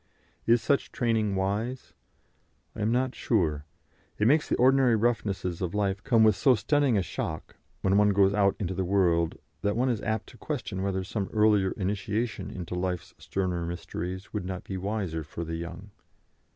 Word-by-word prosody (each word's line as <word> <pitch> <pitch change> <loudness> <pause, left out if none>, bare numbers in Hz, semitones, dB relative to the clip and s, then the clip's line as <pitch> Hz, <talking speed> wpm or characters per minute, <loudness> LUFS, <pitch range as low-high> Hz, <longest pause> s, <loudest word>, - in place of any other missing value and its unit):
Is 115 0 +4
such 140 - +1
training 110 -5 +1
wise? 105 +7 -2 0.8
I 110 - -5
am 105 +2 +1
not 130 +1 +1
sure. 80 - 0 0.5
It 105 - +1
makes 150 +4 +3
the - - +2
ordinary 130 -1 +4
roughnesses 100 -6 -1
of 90 +1 -2
life 100 -1 0
come 115 -4 +4
with 110 -2 +5
so 125 +7 +4
stunning 135 +1 +2
a 95 - +2
shock, - - -5 0.2
when 95 +1 +2
one 105 0 +5
goes 100 0 +4
out 100 -1 +3
into 95 -3 -2
the 95 - -1
world, 85 -3 +2 0.2
that 105 +2 0
one 130 +2 +2
is 115 -4 -1
apt 110 0 -1
to 120 - -15
question 115 -8 -4
whether 95 -1 -1
some 95 +1 -3
earlier 105 -3 +4
initiation 105 +4 -2
into 90 -2 -6
life's 90 -1 -3
sterner 90 -3 -2
mysteries 90 +2 -5
would 105 -3 -2
not 95 +1 -5
be 95 - -6
wiser 95 -4 -2
for 80 +3 -6
the 80 +1 -4
young. 85 +5 -8
100 Hz, 180 wpm, -28 LUFS, 95-115 Hz, 0.8 s, with